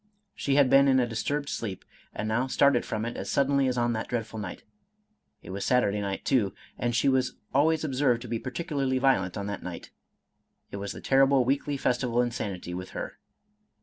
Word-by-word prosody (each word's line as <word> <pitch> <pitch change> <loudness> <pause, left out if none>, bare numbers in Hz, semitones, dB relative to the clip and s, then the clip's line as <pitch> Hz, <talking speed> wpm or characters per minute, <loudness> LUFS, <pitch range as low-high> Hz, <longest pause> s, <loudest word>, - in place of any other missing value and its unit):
She 140 - -1
had 140 -2 +6
been 140 +2 +6
in 130 -1 +5
a 125 - +3
disturbed 140 +5 -2
sleep, 100 -9 -4 0.3
and 110 - -4
now 120 +4 +1
started 140 -1 +3
from 110 +1 -2
it 120 - -4
as - - -5
suddenly 140 -1 +2
as 125 -1 -1
on 120 0 +1
that 110 - -3
dreadful 115 -2 -3
night. 100 -4 -6 0.8
It - - -9
was 100 +1 -4
Saturday 105 -3 +2
night 100 -1 -4
too, 105 -8 +2 0.2
and 120 -1 -1
she 115 - +2
was 130 -1 +2 0.2
always 155 +3 +3
observed 130 -4 +1
to - - -8
be 115 0 -2
particularly 135 0 -2
violent 120 -9 +2
on 100 - -3
that 100 -1 -4
night, - - -8 0.4
— - - -38
^it - - -3
was 100 0 -4
the - - -9
terrible 135 -1 +4
weekly 140 +2 0
festival 125 -2 0
of 125 - +4
insanity 100 -7 -4
with 90 +1 -6
her. - - -6
125 Hz, 205 wpm, -28 LUFS, 110-135 Hz, 0.8 s, had